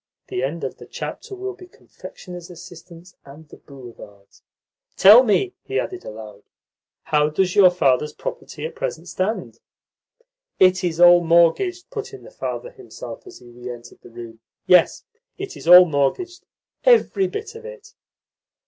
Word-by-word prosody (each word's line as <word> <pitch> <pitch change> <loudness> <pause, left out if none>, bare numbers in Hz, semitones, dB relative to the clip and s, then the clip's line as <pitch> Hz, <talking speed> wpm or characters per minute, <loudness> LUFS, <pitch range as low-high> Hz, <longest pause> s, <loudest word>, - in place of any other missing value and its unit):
"The 125 - -3
end 145 +6 -4
of - - -5
the - - -14
chapter 395 - -8
will 390 +1 -6
be 365 -1 -15
confectioners' 180 - -12
assistants 175 0 -14
and 150 +3 -15
the - - -15
boulevards." 115 -7 -15 0.6
"Tell 210 +6 +8
me," 260 - 0
he - - -3
added 370 - -6
aloud, 105 -2 -11 0.6
"how 150 -1 +1
does 180 +4 -1
your 195 -3 +7
father's 150 -4 +1
property 150 0 -7
at 160 - -6
present 165 +2 -6
stand?" 190 +5 -4 1.0
"It 185 0 +4
is 170 -2 -2
all 175 0 +7
mortgaged," 170 - +2
put 430 -3 -7
in - - -14
the - - -14
father - - -6
himself 400 -3 -11
as 375 - -12
he 120 - -17
re 120 +1 -10
entered 120 -1 -11
the - - -15
room. 115 -1 -11 0.3
"Yes, 180 -3 +3 0.3
it 390 0 -7
is - - -11
all 180 +1 +9
mortgaged, 165 - -2 0.4
every 455 -5 +3
bit 425 +2 -7
of 455 +1 -12
it." 455 -2 -12
180 Hz, 155 wpm, -21 LUFS, -, 1.0 s, all